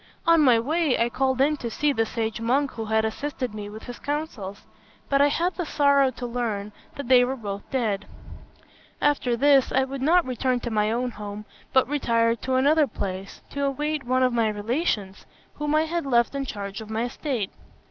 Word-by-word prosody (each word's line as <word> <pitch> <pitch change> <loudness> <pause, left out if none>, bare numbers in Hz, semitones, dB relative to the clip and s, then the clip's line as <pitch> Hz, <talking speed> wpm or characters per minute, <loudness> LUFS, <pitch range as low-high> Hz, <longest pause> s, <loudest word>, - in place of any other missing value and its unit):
On 335 -1 +5
my 250 -5 +5
way, 305 +3 +1
I 235 - +2
called 260 +1 0
in 300 +2 +3
to 235 - -4
see 290 +5 +1
the 225 -3 0
sage 225 -1 -3
monk 270 +5 +1
who 225 - -5
had 220 0 +1
assisted 255 +1 -3
me 205 -1 -6
with 215 +1 -10
his 245 -1 -8
counsels; 260 -10 -4 0.4
but 275 0 +3
I 285 - +6
had 345 +5 0
the 355 - -3
sorrow 280 -3 +3
to 250 0 -7
learn 225 -4 -3 0.2
that 280 -3 -6
they 250 -1 +6
were 260 +2 -1
both 205 -5 -6
dead. 225 -7 -1 0.9
After 270 -5 +1
this, 275 0 +4
I 265 - +3
would 270 0 -5
not 340 +5 +4
return 255 0 0
to 240 - -4
my 210 0 +1
own 245 +2 -1
home, 210 0 -7 0.3
but 260 - +4
retired 230 -5 +1
to 260 0 -1
another 290 +3 +4
place, 195 -4 -6
to 280 - -3
await 295 +2 -1
one 255 +1 +1
of 255 -1 +2
my 230 -2 +2
relations 210 - -2 0.3
whom 295 0 -1
I 310 - +4
had 330 -2 -2
left 235 -1 +3
in 275 -1 -2
charge 200 -3 -6
of 215 - -10
my 220 +1 -1
estate. 245 -4 -3
250 Hz, 200 wpm, -25 LUFS, 220-280 Hz, 0.9 s, I